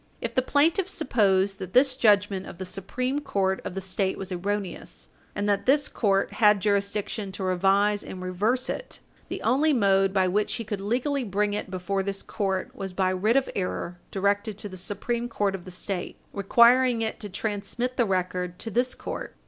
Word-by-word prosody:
If - - -4
the 260 - +3
plaintiff 320 +8 +2
supposed 200 - +2
that 185 -1 -7
this 265 +1 +5
judgment 205 -5 +3
of - - -9
the 185 - -5
Supreme 200 +9 -2
Court 195 -9 0
of - - -6
the 195 - -3
State 190 0 -1
was 195 0 -6
erroneous, 180 - -4 0.3
and 205 0 -1
that 205 +2 0
this 285 +1 +4
court 195 -3 +1
had 210 -3 +5
jurisdiction 200 0 -1
to 190 - -5
revise 195 +3 +2
and 185 - -8
reverse 205 +8 0
it, - - -5 0.3
the - - -5
only 285 +6 +3
mode 195 -5 +3
by 190 -1 +2
which 205 +3 0
he 230 - -4
could 205 -2 -4
legally 255 +7 0
bring 205 -1 0
it 205 - -3
before 190 +1 -2
this 195 0 -3
court 190 -3 -2
was 195 -1 -5
by 185 0 +1
writ 210 +6 +2
of 270 - +2
error 180 -2 -3
directed 200 +1 0
to 210 - -6
the 185 - -9
Supreme 235 +6 -3
Court 205 -4 0
of 190 -2 -6
the - - -8
State, 180 0 -4 0.2
requiring 235 +4 +4
it 220 - -3
to 205 - -6
transmit 215 +5 -3
the 240 - +2
record 180 -2 -1
to 225 - -6
this 250 +4 +1
court. - - -6
200 Hz, 190 wpm, -26 LUFS, 190-235 Hz, 0.3 s, this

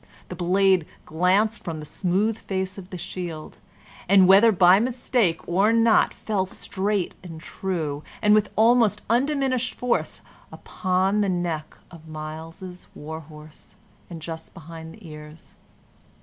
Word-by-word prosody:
The - - -6
blade 185 -1 +2 0.2
glanced 190 +7 +1
from 165 -2 -5
the 150 - -8
smooth 195 +7 0
face 190 -2 -4
of 185 -1 -12
the 185 - -7
shield, 170 -3 -7 0.5
and, 190 -1 +6
whether 200 +4 +7
by 185 -1 +6
mistake 235 -6 0
or 195 +5 +3
not, 230 -1 +4
fell 195 -4 -2
straight 195 0 -2
and 165 -3 -9
true, 160 -5 -4 0.2
and 210 0 +4
with 210 -1 +3
almost 225 -2 +3
undiminished 260 -1 0
force, 250 -1 -2 0.3
upon 190 +2 -1
the 200 - +1
neck 170 -4 -3
of 165 -2 -14
Myles's 160 +4 -8
war 160 +2 -7
horse, 155 0 -15 0.3
and 165 -3 -9
just 160 -1 -8
behind 160 0 -10
the 220 -6 -14
ears. 150 0 -12
185 Hz, 135 wpm, -24 LUFS, 160-210 Hz, 0.5 s, whether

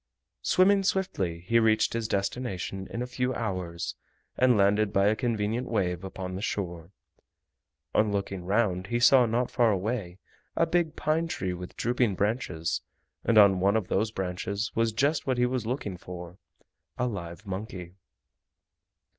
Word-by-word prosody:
Swimming 195 - +4
swiftly 185 - -1
he 115 +7 +3
reached 110 -1 +3
his 115 -1 -1
destination 100 -2 -3
in 120 - -3
a - - -3
few 125 0 -2
hours, 90 -6 -3 0.4
and 125 -3 +4
landed 100 +1 +3
by 100 0 +3
a 105 +2 +4
convenient 115 0 -1
wave 90 -5 -1
upon 95 -1 -6
the 95 - -4
shore. 85 -6 -3 1.0
On 105 -1 +3
looking 100 -2 -3
round 95 -1 +1
he 120 +2 0
saw 125 0 +6
not 120 +2 0
far 120 -2 +3
away 100 -2 -2 0.4
a - - +3
big 170 -3 0
pine 160 +2 0
tree 95 - -2
with 90 0 -8
drooping 120 -4 +1
branches 90 -6 -1 0.4
and 115 - +2
on 100 -3 +7
one 100 +4 +3
of 105 -5 -3
those 105 +3 +1
branches 95 +1 -3
was 115 0 +1
just 140 +8 0
what 130 -2 +1
he 125 - +3
was 125 -3 -2
looking 110 -7 -3
for—a 90 +7 -9
live 95 -4 -5
monkey. 95 -3 -6
105 Hz, 155 wpm, -28 LUFS, 95-120 Hz, 1.0 s, on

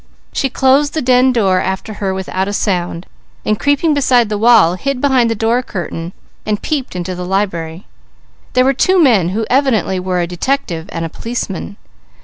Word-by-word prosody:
She 270 - 0
closed 275 +4 +2
the 315 - 0
den 255 +1 +4
door 195 -6 +2
after 190 +3 -3
her 195 -1 0
without 190 0 -3
a 205 - -3
sound, 180 -4 -2 0.4
and 215 0 0
creeping 285 +3 +2
beside 250 -5 +3
the 210 - -1
wall, 220 -7 +5
hid 270 +8 -3
behind 260 -4 +2
the 225 - -1
door 230 +3 +1
curtain 175 -5 -6 0.3
and 210 -1 -1
peeped 275 -9 -3
into 180 +1 -3
the 180 0 -5
library. 180 -3 -2 0.7
There 255 0 +3
were 270 - +3
two 370 +8 +2
men 225 - +4
who 220 +4 -2
evidently 250 -8 +1
were 180 0 -1
a 175 - +1
detective 175 -2 -3
and 165 0 -3
a - - -5
policeman. 205 -2 -5
215 Hz, 180 wpm, -16 LUFS, 185-260 Hz, 0.7 s, wall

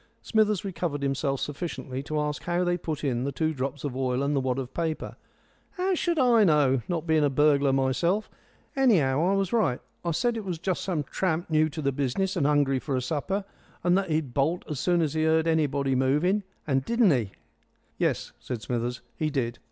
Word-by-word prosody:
Smithers 215 -3 +2
recovered 170 -6 -3
himself 135 0 0
sufficiently 145 -3 -4
to 150 +2 -3
ask 150 0 -2
how 175 +1 +1
they 175 0 +1
put 160 -4 -4
in 125 -4 0
the 140 - -1
two 160 +3 -1
drops 135 0 -4
of 140 -4 -3
oil 130 0 0
and 145 +1 0
the - - +3
wad 130 -1 -1
of 130 -1 -5
paper. 160 -2 -3 0.6
"How 375 +1 0
should 345 -1 0
I 245 -5 +5
know, 145 -7 +3
not 170 -2 -2
being 160 -2 +3
a 145 - +3
burglar 140 0 +3
myself? 140 +10 +1 0.5
Anyhow, 165 - +3
I - - +3
was 195 0 -1
right. 185 - +2 0.2
I 170 - -1
said 235 +8 0
it 220 - -4
was 180 -4 -3
just 185 +2 -2
some 170 -6 -1
tramp 170 +3 -2
new 155 0 +3
to 155 0 -6
the 140 - +2
business, 145 +9 -1
and 150 -6 +2
hungry 145 -3 +2
for 135 +1 -3
a - - +1
supper, 165 +9 -2 0.4
and 175 0 +4
that 195 -2 0
he'd 155 -5 -1
bolt 155 +7 0
as 150 -4 -4
soon 175 +1 +2
as 150 -2 -1
he 155 0 0
heard 160 0 +3
anybody 145 -4 +1
moving. 150 +10 +2 0.2
And 135 -3 +1
didn't 230 - +3
he?" 115 -8 0 0.7
"Yes," - - 0
said 120 -4 -6
Smithers, 120 +2 -2
"he 155 - -1
did. 120 -5 -2
155 Hz, 205 wpm, -27 LUFS, 135-175 Hz, 0.7 s, I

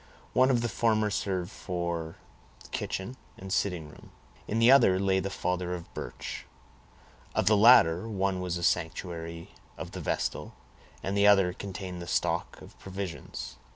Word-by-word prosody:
One 130 +1 +5
of 125 -3 +3
the - - +1
former 110 -1 +1
served 95 -2 -2
for 85 -4 -4 0.6
kitchen 120 +7 -4 0.2
and 95 0 -5
sitting 90 -8 0
room; 75 - -15 0.4
in 110 - -1
the 115 +2 +6
other 115 -9 +6
lay 95 -1 +2
the 95 +1 -3
father 90 -1 -2
of 85 -1 -10
Birch; - - -6 0.9
of - - +2
the 105 +2 +5
latter, 105 -3 +6
one 95 -2 -1
was 90 -1 -2
the 85 - -4
sanctuary 85 -1 -2 0.3
of - - -7
the - - -6
vestal, - - -2 0.5
and 95 +2 -2
the 100 0 +5
other 95 -3 +5
contained 95 -2 -6
the 85 - -7
stock - - -1
of - - -15
provisions. 95 -2 -6
95 Hz, 155 wpm, -29 LUFS, 85-100 Hz, 0.9 s, the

